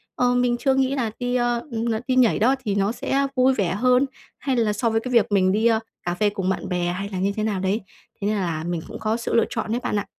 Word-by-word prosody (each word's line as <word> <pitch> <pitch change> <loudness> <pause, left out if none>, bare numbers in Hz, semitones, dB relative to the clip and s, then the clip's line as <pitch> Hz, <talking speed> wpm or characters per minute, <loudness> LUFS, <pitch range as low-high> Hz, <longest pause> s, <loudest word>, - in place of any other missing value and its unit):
Ờ, 245 0 +2
mình 245 -1 +2
chưa 265 +2 +2
nghĩ 265 +1 +1
là 230 -5 -1
đi, 245 0 -1
ơ, 240 -1 +1
n 225 +1 -1 0.2
đi 255 - +1
nhảy 245 -5 +4
đó 255 +5 +4
thì 200 -1 0
nó 200 +2 +1
sẽ 275 +3 0
vui 255 +1 +4
vẻ 190 -6 0
hơn 250 +4 +3 0.3
hay 270 -2 -1
là 220 -3 +2
so 230 +3 0
với 225 0 +1
cái 255 +1 -5
việc 230 -3 +3
mình 185 -2 +3
đi, 215 +3 +1
a, 225 -1 +3 0.2
cà 175 0 -2
phê 210 +2 +2
cùng 190 -2 -2
bạn 190 - -2
bè 175 -1 0
hay 200 +3 -4
là 190 - -5
như 195 +2 +1
thế 215 - -2
nào 205 -4 -1
đấy. 195 +4 0 0.4
Thế 200 - 0
nên 210 0 +1
là 165 -4 -2
mình 170 -1 -2
cũng - - -8
có 220 +1 0
sự 235 - -4
lựa 230 - +4
chọn 220 -2 -3
đấy 240 - 0
bạn - - -1
ạ. - - -4
220 Hz, 290 wpm, -23 LUFS, 195-245 Hz, 0.4 s, nhảy